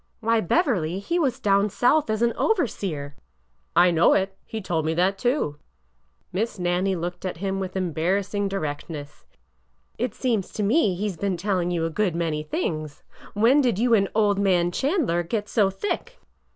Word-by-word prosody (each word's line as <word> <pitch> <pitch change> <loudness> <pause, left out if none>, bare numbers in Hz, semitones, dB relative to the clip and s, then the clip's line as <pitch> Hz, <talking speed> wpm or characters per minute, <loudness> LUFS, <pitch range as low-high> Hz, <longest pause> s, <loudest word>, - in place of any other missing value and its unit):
'' - - -44
Why, 230 0 +2
Beverly, 185 - +1
he 335 - -1
was 270 -7 0
down 200 0 +2
South 250 +6 +2
as 215 +1 0
an 235 -1 +2
overseer! 190 - -1 0.2
" - - -44
'' 60 - -44
I 180 - +4
know 170 0 +4
it. 195 0 0
He 225 - -5
told 170 -5 -1
me 160 +1 -1
that, 185 +3 +2
too." 240 - 0 0.7
Miss 215 +4 -2
Nannie 180 +2 0
looked 175 +1 -5
at 185 -3 -4
him 195 +2 -2
with 190 -1 -5
embarrassing 190 +3 0
direct 155 -6 -4
ness. 150 -2 -9 0.4
'' - - -43 0.3
It 245 +2 -2
seems 230 -7 -1
to 210 - -2
me, 205 - +3
he 205 +4 -2
's 190 -5 -5
been 195 0 -1
telling 180 -1 0
you 170 -2 0
a 165 - -2
good 185 -1 0
many 160 -3 -1
things. 155 -1 -4 0.3
When 235 +8 +5
did 240 -7 +1
you 235 +2 +2
and 195 -3 +3
old 205 -2 +3
man 180 -3 +2
Chandler 265 - +1
get 205 +5 -3
so 205 -3 +2
thick?" 415 - -4
195 Hz, 190 wpm, -24 LUFS, 170-220 Hz, 0.7 s, When